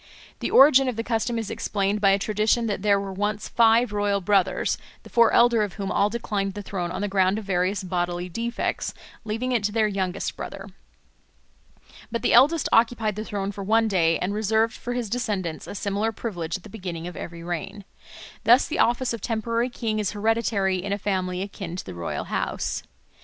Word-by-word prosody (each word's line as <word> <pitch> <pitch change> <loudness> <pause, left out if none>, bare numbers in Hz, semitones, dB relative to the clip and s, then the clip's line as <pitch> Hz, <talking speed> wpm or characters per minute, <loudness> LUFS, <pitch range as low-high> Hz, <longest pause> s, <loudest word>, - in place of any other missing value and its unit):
The - - -2
origin 270 -1 +7
of 250 - -1
the 230 - -2
custom 230 0 -1
is 225 -2 -3
explained 200 0 -1
by 200 - +5
a 195 - +4
tradition 215 +3 +1
that 205 -4 -2
there 200 -1 +3
were 195 -1 -5
once 205 +2 -2
five 230 0 +4
royal 205 -1 +1
brothers, 190 -1 +1 0.2
the - - -14
four 235 -1 +5
elder 235 -2 +5
of 205 -3 -2
whom 200 -2 -4
all 205 - +2
declined 205 -4 -2
the 205 - -5
throne 180 -3 -3
on 185 +2 -4
the 205 - 0
ground 190 0 +2
of 220 - -5
various 190 +1 0
bodily 175 -1 -2
defects, 230 +6 -3 0.3
leaving 225 +4 -2
it 235 -4 +1
to 210 - 0
their 220 0 +2
youngest 190 -3 -2
brother. 195 +1 -7 1.4
But 235 - -3
the - - +2
eldest 285 +7 +5
occupied 225 -2 +3
the 215 - -4
throne 200 -2 -3
for 200 0 -7
one 225 +3 +3
day, 165 -5 +2
and 185 +3 -2
reserved 220 +2 +1
for 245 - -5
his 245 -2 -2
descendants 200 -8 -3
a - - -7
similar 205 +2 -1
privilege 175 -7 -4
at 185 - -19
the - - -11
beginning 180 -6 -6
of 180 - -7
every 170 0 -7
reign. 175 +4 -5 0.6
Thus 240 +4 +5
the 320 - -3
office 240 +1 +2
of 230 - -5
temporary 230 +2 -1
king 225 -3 -2
is 210 -2 -1
hereditary 210 -3 +1
in 200 +2 -4
a 200 - +1
family 185 -2 -2
akin 195 -3 -6
to 185 - -6
the 95 - -7
royal 85 -1 -4
house. - - -2
205 Hz, 200 wpm, -25 LUFS, 190-225 Hz, 1.4 s, origin